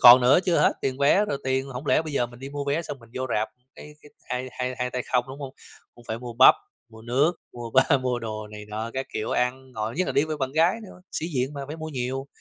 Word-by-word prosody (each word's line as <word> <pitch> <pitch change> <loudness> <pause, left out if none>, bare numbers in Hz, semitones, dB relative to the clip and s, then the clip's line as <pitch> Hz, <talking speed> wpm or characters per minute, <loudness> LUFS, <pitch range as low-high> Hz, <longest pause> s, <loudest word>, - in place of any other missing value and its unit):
còn 125 +1 +11
nữa 125 +5 +6
chưa 175 -3 +3
hết, - - +5
tiền 130 -1 -1
vé 145 +9 +5
rồi 145 -9 -2
tiền 130 0 0
hổng 135 +2 -7
lẽ 155 - +4
bây 155 -2 -6
giờ 125 -4 +1
mình 120 0 -14
đi 135 +2 -7
mua 145 0 -4
vé 145 +4 0
xong 145 - -6
mình 115 -2 -18
vô 130 0 -2
rạp, 110 +1 +1 0.3
cái 150 - -11
cái 150 - -15 0.2
hai 125 +1 -2
hai 125 0 -3
hai 125 0 -1
tay 125 0 -2
không, 125 -1 +3
đúng 135 - -8
không? 135 -1 -6 0.4
Cũng 120 - -17
phải 110 - -2
mua 120 0 -7
bắp, 125 +3 +8 0.3
mua 110 -1 -14
nước, 130 +8 +2 0.2
mua 120 -1 -7
ba 135 +3 +5
mua 125 -1 -1
đồ 110 -2 -5
này 105 0 -9
nọ 110 +2 -4
các 130 0 -2
kiểu 110 - -2
ăn 130 +1 -1
ngồi, 110 -1 -3
nhất 185 - +1
là - - -1
đi 140 - +3
với 155 -1 -3
bạn 135 -2 -2
gái 170 +8 +3
nữa, 190 -3 -12
sĩ 160 - -1
diện 130 +2 0
mà 140 - -5
phải 150 +3 -6
mua 160 0 -5
nhiều. 135 -1 -3
130 Hz, 280 wpm, -26 LUFS, 120-140 Hz, 0.4 s, còn